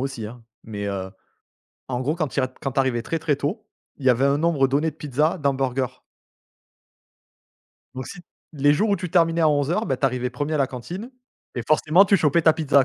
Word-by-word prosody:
aussi, 135 -5 -4
hein. 115 +2 -11 0.2
Mais 100 -2 -5
heu, 95 -1 -4 0.8
en 125 -1 -2
gros 145 +5 -1
quand 160 -3 -1
tu 140 - -3
y - - +2
a - - +1
tu 130 - -24 0.2
arrivais 130 -3 +1
très, 165 - -2
très 155 -3 +1
tôt, 155 - -3 0.3
il 140 - -9
y - - +6
avait 125 +2 +3
un 140 +1 +3
nombre 150 -4 +2
donné 145 +4 +1
de - - -23
pizzas 150 +2 0
d'hamburgers 135 -2 -1 1.9
donc 130 -1 -6
si 180 - -9 0.3
les 145 -1 +3
jours 205 +8 +1
où 200 - +3
tu 180 -2 -5
terminais 165 -1 +3
à 155 - +5
11:00, 145 +3 +1
bah, 135 - 0
tu 135 - +1
arrivais 125 -1 -2
1e 145 +5 -3
à - - 0
la 135 - +3
cantine 175 - -7 0.4
et 120 - -3
forcément 155 +5 +5
tu 200 0 +4
chopais 160 0 +2
ta 160 - +6
pizza, 145 -4 +3
140 Hz, 215 wpm, -23 LUFS, 130-160 Hz, 1.9 s, y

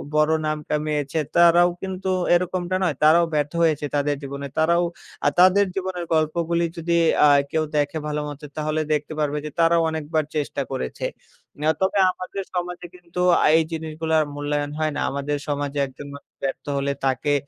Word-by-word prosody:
বড় 150 +1 +4
নাম 155 0 0
কামিয়েছে 150 0 -1 0.2
তারাও 175 +1 +6
কিন্তু 190 0 -4 0.2
এরকমটা 180 +1 0
নয়। 170 -6 +1
তারাও 165 +3 +6
ব্যর্থ 145 -1 0
হয়েছে 155 -3 +2
তাদের 145 0 +1
জীবনে। 140 0 -5
তারাও 170 +2 +3 0.4
আ - - +5
তাদের 185 +2 +6
জীবনের 185 -2 -3
গল্প 155 -1 +2 0.2
গুলি 170 0 +2
যদি 170 +1 -1 0.3
অ্যা 150 - +7 0.2
কেউ 160 0 +1
দেখে 145 +1 0
ভালোমতো 150 -1 -4
তাহলে 155 +1 -1
দেখতে 150 +1 -2
পারবে 150 -1 0
যে, - - -3
তারাও 165 0 +4
অনেকবার 155 0 -1
চেষ্টা 150 -2 -2
করেছে। 65 - -4 0.5
এ - - -9 0.2
তবে 190 +1 +2
আমাদের 185 +2 -6
সমাজে 180 0 -3
কিন্তু 175 0 -9 0.2
আ - - +4
এই 165 - +3
জিনিসগুলার 160 0 0
মূল্যায়ন 145 0 -2
হয় 155 0 +1
না। - - -2
আমাদের 140 +1 -2
সমাজে 145 -1 -2
একজন 135 +2 -11
মানুষ 140 - -15
ব্যর্থ 135 -1 -3
হলে 140 0 0
তাকে 135 +2 +1
155 Hz, 170 wpm, -23 LUFS, 145-170 Hz, 0.5 s, অ্যা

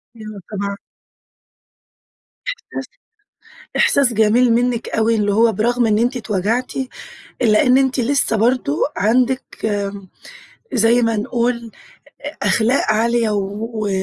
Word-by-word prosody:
أيوه، 215 -3 -9
طبعًا. 200 -1 -3 1.7
إحساس - - -6 0.9
إحساس 270 -4 +3
جميل 225 +3 +3
منِّك 240 0 0
أوي 225 +1 +1
اللي 205 -2 +1
هو 225 +1 +4
برغم 235 +3 +1
إن 210 -1 +2
أنتِ 245 +3 0
اتوجعتِ، 220 +2 -1 0.7
إلّا 220 +4 +3
إن 255 +1 +5
أنتِ 265 -1 +1
لسّه 245 -2 +1
برضو 230 - +1 0.2
عندِك، 250 +5 0
آمم، 200 -2 -3 0.7
زي 235 +1 +3
ما 230 -2 +1
نقول 235 +1 -2 0.7
أخلاق 235 +5 +2
عالية 230 0 +1
و 210 +2 -3
230 Hz, 110 wpm, -19 LUFS, 210-245 Hz, 1.7 s, إن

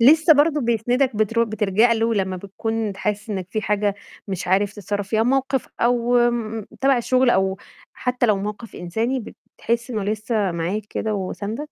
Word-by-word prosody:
لسه 315 +7 +7
برضه 295 +1 +3
بيسندك 240 +1 +1
بترو 230 +2 +2
بتلجأ 215 +1 +2
له 225 0 +1
لمّا 190 -2 -1
بتكون 220 +3 -3
ت - - -14
حاسس 210 +2 -3
إنّك 190 -3 -3
في 215 0 -2
حاجة 205 -1 +1 0.3
مش 185 -2 -4
عارف 195 +2 +2
تتصرف 205 -1 -4
فيها، 220 +1 +2
موقف 265 +2 0
أو 240 0 +3 0.6
تبع 270 -1 +4
الشغل، 255 +1 +3
أو 190 -2 +2 0.4
حتى 250 -1 0
لو 210 -2 +3
موقف 210 +3 -6
إنساني، 225 +9 -1 0.4
بتحس 235 +2 -1
إنه 215 -4 -2
لسه 210 -2 -1
معاك 175 +6 -2
كده، 215 -1 -2
وساندك؟ 200 +3 -4
220 Hz, 165 wpm, -22 LUFS, 200-240 Hz, 0.6 s, لسه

